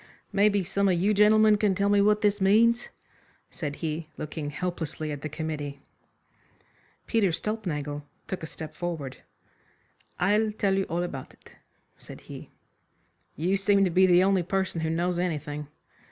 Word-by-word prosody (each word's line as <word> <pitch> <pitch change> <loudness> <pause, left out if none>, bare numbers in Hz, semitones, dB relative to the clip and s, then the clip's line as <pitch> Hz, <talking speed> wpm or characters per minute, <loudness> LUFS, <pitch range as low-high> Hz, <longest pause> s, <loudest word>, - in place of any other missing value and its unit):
"Maybe 200 -1 +3
some 200 +3 +1
of 175 -2 +2
you 200 +4 +2
gentlemen 210 +1 +5
can 205 -2 +2
tell 200 +1 +1
me 205 0 +4
what 210 +1 +3
this 205 -1 +2
means," 230 +5 +4 0.6
said 145 -3 -4
he, 160 0 -4
looking 150 -1 -5
helplessly 160 -1 -4
at 145 -1 -5
the 155 - -4
committee. 150 -2 -5 1.3
Peter 220 -5 +2
Stulpnagel 155 -8 -3 0.3
took 190 - -4
a 160 - -5
step 155 0 -8
forward. 155 -5 -5 1.0
"I'll 210 +4 +2
tell 200 -2 +1
you 195 0 +1
all 170 +2 -2
about 140 -7 -6
it," - - -20 0.4
said - - -12
he. - - -10 0.9
"You 180 +5 +1
seem 200 0 +3
to 180 - 0
be 185 +2 +5
the 180 0 +5
only 195 -1 +3
person 190 -1 -2
who 160 - -1
knows 175 +2 0
anything." 150 -4 -3
180 Hz, 155 wpm, -27 LUFS, 155-200 Hz, 1.3 s, gentlemen